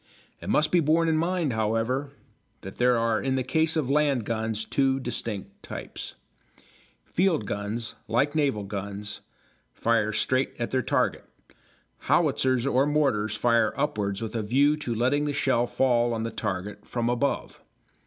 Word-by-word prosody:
It - - -6
must 155 0 +3
be 180 - +5
borne 165 +1 +3
in 160 - +2
mind, 170 -3 0
however, 115 +5 0 0.5
that 95 - -9
there 125 0 +4
are 115 -1 +1
in 130 -1 0
the 130 - 0
case 160 +5 +1
of 150 -5 0
land 140 -4 +2
guns 110 -1 -2
two 135 +1 +1
distinct 105 -6 -5
types. - - -7 0.9
Field 170 - +1
guns, 105 +3 -4
like 130 +7 +1
naval 140 -9 +1
guns, 100 +1 -5 0.5
fire 115 -2 +1
straight 130 +5 +1
at 120 - -3
their 130 - +2
target; - - 0 0.8
howitzers 130 -1 +2
or 135 +1 +2
mortars 130 -8 +1
fire 115 -1 +2
upwards 100 0 -1
with 115 - -5
a 115 - 0
view 140 +8 +3
to 125 -6 -3
letting 130 +6 +1
the 145 - -1
shell 120 -3 +1
fall 120 -3 +2
on 110 - -2
the 115 - -3
target 95 +2 -4
from 120 -1 -1
above. 125 +4 -1
120 Hz, 155 wpm, -26 LUFS, 110-140 Hz, 0.9 s, be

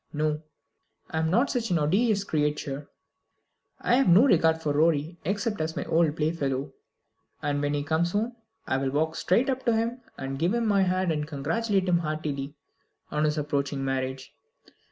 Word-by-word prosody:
No; 150 0 0 0.7
I 160 - -1
am 160 0 +1
not 235 - +2
such 235 -3 -1
an 175 - +2
odious 200 +7 +2
creature. 150 -4 -2 0.9
I - - +1
have 270 - +3
no 190 +9 +7
regard 160 - +4
for 150 -3 -1
Rorie 160 +2 +1
except 205 +2 -1
as 160 0 -2
my - - -3
old 165 -1 +2
playfellow, 140 -3 -1 0.7
and 145 -1 0
when 145 0 0
he 145 - -1
comes 160 +4 0
home 225 +4 -1 0.3
I 130 - 0
will 135 0 0
walk 160 +3 0
straight 225 +8 +2
up 265 -1 -1
to 235 -2 +3
him 230 +3 -1 0.2
and 135 0 -4
give 175 +8 +1
him 235 -1 0
my 200 -2 +3
hand, 185 -1 +1
and 150 -1 -2
congratulate 185 +7 0
him 175 -1 +3
heartily 155 -3 -3 0.6
on 150 +1 +1
his 150 0 0
approaching 140 -2 -1
marriage. 130 0 -3
160 Hz, 175 wpm, -27 LUFS, 145-195 Hz, 0.9 s, no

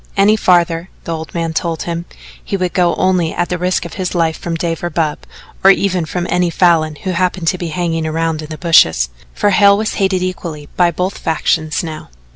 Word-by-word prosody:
Any 200 +2 +5
farther, 175 -3 +2
the 165 - -3
old 160 0 -7
man 165 -1 -1
told 165 -1 -2
him, 170 0 -4 0.4
he 200 - -2
would 180 -2 -2
go 175 -2 +2
only 185 -3 +1
at 175 0 -1
the 180 - -2
risk 180 0 0
of 170 - -8
his 180 0 -2
life 165 -2 +1
from 170 -1 -4
Dave 165 0 -3
or 175 - -1
Bub, 155 -2 -1 0.4
or 195 - +8
even 185 -3 +2
from 175 +2 -3
any 180 -1 +1
Falin 165 -3 +2
who 190 - -1
happened 180 -1 -1
to 185 - -1
be 175 - -3
hanging 165 -1 -2
around 160 0 -1
in 155 - -9
the 155 - -6
bushes, 80 - +4 0.3
for 205 - +2
Hale 200 0 +5
was 215 +1 -1
hated 190 -1 +1
equally 170 -5 -5
by 175 -1 +4
both 180 +3 -3
factions 160 -1 0
now. 155 - -7
170 Hz, 215 wpm, -16 LUFS, 160-185 Hz, 0.4 s, or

